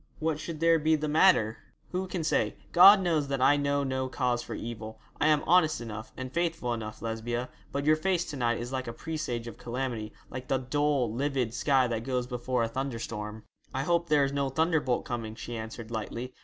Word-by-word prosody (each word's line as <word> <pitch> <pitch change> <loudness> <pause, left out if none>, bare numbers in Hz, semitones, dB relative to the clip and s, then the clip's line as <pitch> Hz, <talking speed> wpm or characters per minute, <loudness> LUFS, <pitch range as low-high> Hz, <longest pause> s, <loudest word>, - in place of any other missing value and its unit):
'What 155 -1 -1
should 160 -1 -6
there 165 0 +5
be 155 +1 +3
the 155 0 -2
matter?' 150 - +4 0.3
'Who 185 +1 -2
can 180 -3 -3
say? 155 - +1 0.2
God 195 +3 +9
knows 160 -5 +1
that 135 -1 -1
I 140 +3 +5
know 145 0 +1
no 130 -1 -2
cause 125 -2 0
for - - -6
evil. 110 -1 -7 0.2
I 155 - +3
am 150 -1 +3
honest 160 -3 +4
enough, 110 -2 -7
and 130 0 -6
faithful 165 -7 0
enough, 110 -2 -6
Lesbia. 120 +2 -3 0.2
But 140 0 -2
your 155 +1 +5
face 175 +2 0
to - - -6
night 120 -3 +1
is 120 +2 -5
like 130 -2 -3
a 115 - -4
presage 150 -5 -4
of 115 -3 -9
calamity, 120 -3 -3 0.2
like 125 0 -6
the 135 - +2
dull, 135 -2 0
livid 130 -2 -1
sky 135 0 +3
that 115 -2 -2
goes 125 -1 -1
before 125 0 -1
a - - +1
thunderstorm.' 115 -4 -4 0.3
'I 135 - 0
hope 170 +1 +1
there 150 -2 +5
is 135 0 -1
no 140 -1 0
thunderbolt 160 -3 +1
coming,' 115 -3 -4
she 120 +1 -6
answered, 110 0 -7
lightly. 115 +3 -4
130 Hz, 210 wpm, -29 LUFS, 120-155 Hz, 0.3 s, God